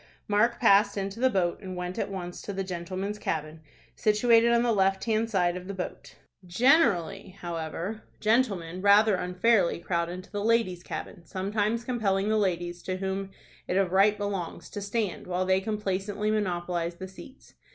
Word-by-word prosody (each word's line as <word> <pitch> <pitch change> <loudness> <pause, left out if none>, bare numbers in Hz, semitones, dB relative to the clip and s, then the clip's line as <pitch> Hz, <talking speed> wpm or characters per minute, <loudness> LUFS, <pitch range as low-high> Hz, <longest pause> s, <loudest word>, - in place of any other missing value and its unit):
Mark 210 +3 +2
passed 205 -3 +5
into 195 +2 -3
the 260 +1 +4
boat, 185 -5 0
and 185 -2 -6
went 180 0 -4
at - - -1
once 180 -2 -6
to - - -5
the 195 0 -3
"gentlemen's 185 +3 -4
cabin," 155 0 -3 0.3
situated 230 +2 +4
on 235 0 +4
the 240 - +2
left 195 -2 +2
hand 225 0 0
side 180 -4 +1
of 180 0 -7
the 200 - -5
boat. 180 - -6 0.3
Generally, 200 - +2
however, 170 +5 -4 0.2
gentlemen 200 -7 +1
rather 205 +2 +6
unfairly 180 +2 +2
crowd 170 0 -1
into 185 +1 -8
the 205 -1 -3
ladies' 220 -6 +1
cabin, 175 0 -7
sometimes 205 +5 -1
compelling 210 -5 0
the 220 - +2
ladies, 175 -3 -1
to 185 0 -3
whom 195 0 -3 0.4
it 180 - 0
of 195 -3 +2
right 200 +2 +4
belongs, 200 -4 -4
to 205 - -5
stand, 200 -3 -2
while 180 +1 -1
they 190 0 +2
complacently 210 0 -2
monopolize 175 -4 -1
the 190 +2 -7
seats. 225 +8 -14
195 Hz, 170 wpm, -28 LUFS, 180-215 Hz, 0.4 s, rather